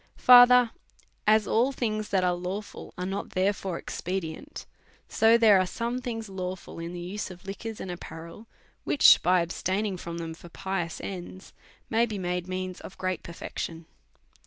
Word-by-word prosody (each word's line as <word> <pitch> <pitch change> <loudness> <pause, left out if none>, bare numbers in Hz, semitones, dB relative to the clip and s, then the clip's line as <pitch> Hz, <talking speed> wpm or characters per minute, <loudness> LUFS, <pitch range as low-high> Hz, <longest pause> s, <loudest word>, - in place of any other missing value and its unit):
Further, 245 -1 +8 0.6
as 215 0 +5
all 245 +5 +2
things 215 -5 -2
that 190 -2 +2
are 180 -1 +2
lawful 185 +4 -6
are 180 - -3
not 195 +2 -4
there 190 +2 +1
fore 190 -3 -5
expedient, 185 - -5 0.4
so 225 +1 +4
there 215 -4 +6
are 185 - +1
some 235 +6 -3
things 225 -3 -4
law 185 -1 -4
fill 175 - -11
in 165 +1 -5
the 175 - -6
use 185 +4 -5
of 185 +2 -12
liquors 205 +3 -6
and 185 - -5
apparel, 170 +4 -9 0.4
which 290 - +6
by 180 +1 +3
abstaining 190 +3 -2
from 170 -1 -6
them 165 -1 -5
for 175 +1 -13
pious 190 -2 -4
ends 185 0 -8 0.3
may 230 +1 +2
be 215 -2 -4
made 180 -1 -2
means 185 0 -4
of 190 - -11
great 185 -1 -2
per 170 - -9
fection. 165 0 -6
190 Hz, 175 wpm, -27 LUFS, 175-220 Hz, 0.6 s, Further